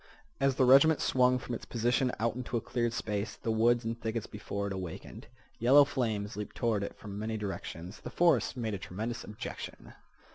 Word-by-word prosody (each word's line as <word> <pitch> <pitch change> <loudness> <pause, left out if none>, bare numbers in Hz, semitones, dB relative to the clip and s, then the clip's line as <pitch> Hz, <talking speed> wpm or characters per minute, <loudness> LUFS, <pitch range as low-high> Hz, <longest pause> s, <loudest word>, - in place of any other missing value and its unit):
As 135 -1 +2
the 130 - +4
regiment 140 +5 +7
swung 125 0 +3
from 125 -1 -6
its - - -4
position 120 +2 +1
out 115 +2 +1
into 125 0 -3
a - - +1
cleared 120 +1 -1
space 105 -2 -3
the 115 - -3
woods 115 +2 +3
and 115 +1 -3
thickets 115 -1 -2
before 100 -1 -5
it 100 - -3
awakened. 95 -3 -7 0.3
Yellow 135 +5 +7
flames 110 -8 -2
leaped 105 0 -6
toward 115 -4 +1
it 100 - -5
from 100 -1 -7
many 110 +1 -2
directions. 95 -2 -6
The - - -7
forest 155 -9 +2
made 110 -3 -2
a 100 - -3
tremendous 110 +6 -4
objection. 105 - -8
115 Hz, 190 wpm, -31 LUFS, 105-125 Hz, 0.3 s, regiment